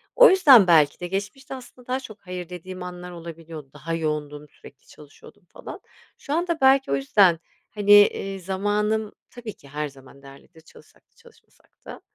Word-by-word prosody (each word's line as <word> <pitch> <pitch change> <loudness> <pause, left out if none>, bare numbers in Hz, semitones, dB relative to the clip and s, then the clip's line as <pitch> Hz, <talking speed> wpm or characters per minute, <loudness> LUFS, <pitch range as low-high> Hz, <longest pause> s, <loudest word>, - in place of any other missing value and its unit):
O - - +8
yüzden 280 - +7
belki 155 -4 +4
de 175 - -5
geçmişte 205 +9 -5
aslında 250 -1 -14
daha 255 +1 -1
çok 215 -5 -12
"hayır" 180 -1 -7
dediğim 180 +1 -9
anlar 180 0 -8
olabiliyordu. 165 -3 -10
Daha 160 +3 -6
yoğundum, 150 -2 -4
sürekli 140 - -18
çalışıyordum 150 +3 -17
falan. - - -10 0.4
Şu 285 - -6
anda 340 -1 -1
belki 265 - +4
o - - +2
yüzden, 165 +5 +3 0.3
hani, 205 0 +6
iii, 195 0 -6
zamanım 205 +3 -2 0.2
tabii 235 -4 -9
ki 140 - -20
her 150 +1 -4
zaman 135 0 -18
değerlidir, 140 +4 -17
çalışsak 160 - -20
da - - -41
çalışmasak 475 -1 -24
da. - - -10
180 Hz, 170 wpm, -23 LUFS, 155-220 Hz, 0.4 s, O